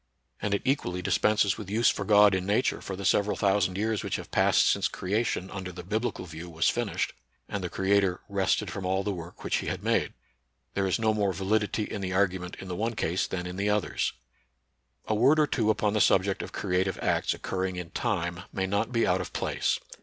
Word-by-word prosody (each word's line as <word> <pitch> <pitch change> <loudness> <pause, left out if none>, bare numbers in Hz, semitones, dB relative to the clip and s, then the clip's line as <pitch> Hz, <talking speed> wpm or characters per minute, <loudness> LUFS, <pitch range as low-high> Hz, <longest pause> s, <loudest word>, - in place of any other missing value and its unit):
And 100 -1 +1
it - - -3
equally 90 -10 0
dispenses 105 +1 +2
with 105 -3 -7
use 115 +3 +3
for - - -4
God 105 -1 +6
in 95 -1 0
Nature 105 +6 +1
for 95 - -5
the 100 +1 -6
several 100 +2 +2
thousand 95 -2 +2
years 110 +1 0
which - - -2
have - - -7
passed - - +4
since - - +2
creation 100 -1 -2
under 95 -2 -5
the 90 0 -8
biblical 110 +2 -2
view 85 +1 -8
was 80 0 +2
finished, - - -2 0.3
and 100 -2 -4
the 90 - -2
Creator 95 -1 +2
" - - -37
rested 100 -2 0
from 100 - -5
all 95 +1 0
the 105 - -1
work 85 -1 -9
which - - +1
he - - -4
had - - -3
made." - - +1 0.6
There 100 -1 0
is 95 - +1
no 110 -1 +2
more 100 -3 +1
validity 105 +4 0
in 105 -1 -5
the 95 -1 -2
argument 95 -2 0
in 95 - -9
the 90 - -4
one 115 +4 -1
case 90 -4 0
than 90 -1 -4
in 90 +1 -6
the 100 +1 0
others. 105 -1 0 0.9
A - - 0
word 130 +8 +4
or 150 - +5
two 115 -6 0
upon 105 -1 +1
the 110 - +2
subject 95 +1 +3
of - - -7
creative 95 0 -1
acts - - +1
occurring 95 0 -3
in 90 -1 -6
time 90 -3 -2
may 95 - -1
not 100 +5 -1
be 115 -2 +2
out 90 +1 +2
of 90 - -7
place. - - 0
100 Hz, 220 wpm, -28 LUFS, 90-105 Hz, 0.9 s, God